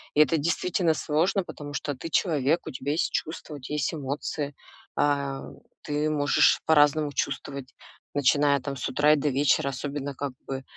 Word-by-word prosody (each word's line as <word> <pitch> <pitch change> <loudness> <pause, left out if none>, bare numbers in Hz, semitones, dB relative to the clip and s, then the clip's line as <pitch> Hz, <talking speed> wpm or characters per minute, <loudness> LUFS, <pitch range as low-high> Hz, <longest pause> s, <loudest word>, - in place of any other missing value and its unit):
И - - +3
это 165 +2 +4
действительно 170 +2 +1
сложно, 165 +6 +1
потому 145 -4 -8
что 145 - -2
ты 165 +6 -7
человек, 155 -1 +2
у - - -5
тебя 135 +2 -3
есть 165 - 0
чувства, 155 -1 -4
у - - -8
тя 130 +3 -7
есть 150 0 0
эмоции. 145 0 -3 0.4
А, 140 -2 0 0.4
ты 150 +1 -1
можешь 145 -1 +4
по-разному 150 -1 +4
чувствовать, 140 -1 -3 0.4
начиная 145 0 +3
там 140 +2 -5
с 130 - -3
утра 145 +3 +4
и - - +5
до 145 0 0
вечера, 140 0 +2
особенно, 140 +1 -4
как 140 0 -3 0.2
бы, 135 -1 -4
145 Hz, 175 wpm, -26 LUFS, 140-155 Hz, 0.4 s, и